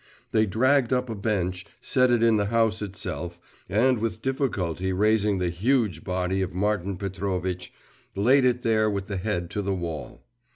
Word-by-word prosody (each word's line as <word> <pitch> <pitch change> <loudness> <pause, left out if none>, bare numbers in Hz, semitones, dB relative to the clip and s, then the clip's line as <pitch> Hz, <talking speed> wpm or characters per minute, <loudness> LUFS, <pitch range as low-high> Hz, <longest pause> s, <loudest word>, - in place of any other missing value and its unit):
They 110 -1 +3
dragged 130 +5 +2
up 125 -2 0
a - - -3
bench, 95 -4 -1 0.2
set 130 0 +2
it 120 -1 +3
in 115 -2 +5
the 100 -1 +1
house 115 -1 +1
itself, 90 -4 -5 0.3
and 120 +4 +3
with 110 0 -3
difficulty 95 - -1
raising 105 +1 +2
the 90 -1 0
huge 105 - +1
body 90 +1 -1
of 90 -2 -3
Martin 100 -1 0
Petrovitch, 95 -2 -3 0.4
laid 125 +7 +4
it 125 -1 +2
there 110 -1 +3
with 100 -2 -2
the 100 -1 -4
head 90 -3 -2
to 105 - -2
the 100 -1 -1
wall. 85 -4 -6
100 Hz, 170 wpm, -26 LUFS, 90-115 Hz, 0.4 s, in